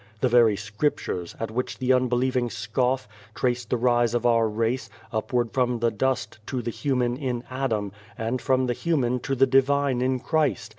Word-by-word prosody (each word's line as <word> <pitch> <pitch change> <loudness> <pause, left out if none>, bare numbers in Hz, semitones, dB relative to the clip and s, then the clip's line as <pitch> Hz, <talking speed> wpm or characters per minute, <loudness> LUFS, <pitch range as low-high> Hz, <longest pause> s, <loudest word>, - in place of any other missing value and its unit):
The 130 - +3
very 115 -3 +5
Scriptures, 105 - -2
at 115 -1 -3
which 125 +3 -3
the 130 0 +2
unbelieving 125 0 +1
scoff, 125 +1 -1 0.3
trace 120 -1 0
the 125 - -1
rise 120 -1 +2
of 120 0 0
our 115 -2 +4
race, 115 +4 -1 0.2
upward 120 +1 0
from 125 -2 +1
the 115 0 +1
dust, 110 -2 -1
to 125 -3 -3
the 120 - -2
human 125 -2 0
in 125 -3 -3
Adam, 115 -7 -1 0.3
and 115 +3 -2
from 130 -1 +2
the 125 - 0
human 125 -4 0
to 135 +2 -2
the 135 +1 +5
Divine 135 0 +2
in 130 0 +1
Christ. 135 - 0
125 Hz, 180 wpm, -25 LUFS, 115-130 Hz, 0.3 s, very